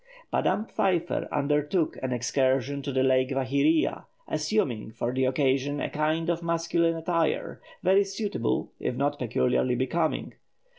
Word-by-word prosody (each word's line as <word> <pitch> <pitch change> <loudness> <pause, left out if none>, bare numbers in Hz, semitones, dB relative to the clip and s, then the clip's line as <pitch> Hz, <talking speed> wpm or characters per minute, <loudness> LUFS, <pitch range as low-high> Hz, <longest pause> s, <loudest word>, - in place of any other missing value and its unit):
Madame 215 - +1
Pfeiffer 175 -5 0
undertook 150 +3 +1
an 130 - -2
excursion 130 +2 0
to 140 - -4
the 130 0 +1
Lake 130 0 +3
Vaihiria, 140 +4 +1 0.2
assuming 150 - -1
for 120 +2 -3
the 130 0 +1
occasion 135 +2 +1
a - - -3
kind 155 +2 0
of 170 0 0
masculine 170 0 +1
attire, 165 0 -1 0.2
very 190 +2 +5
suitable 195 - -2
if - - -2
not 145 +2 -1
peculiarly 125 +1 +1
becoming. 155 +6 -1
145 Hz, 135 wpm, -27 LUFS, 130-165 Hz, 0.2 s, very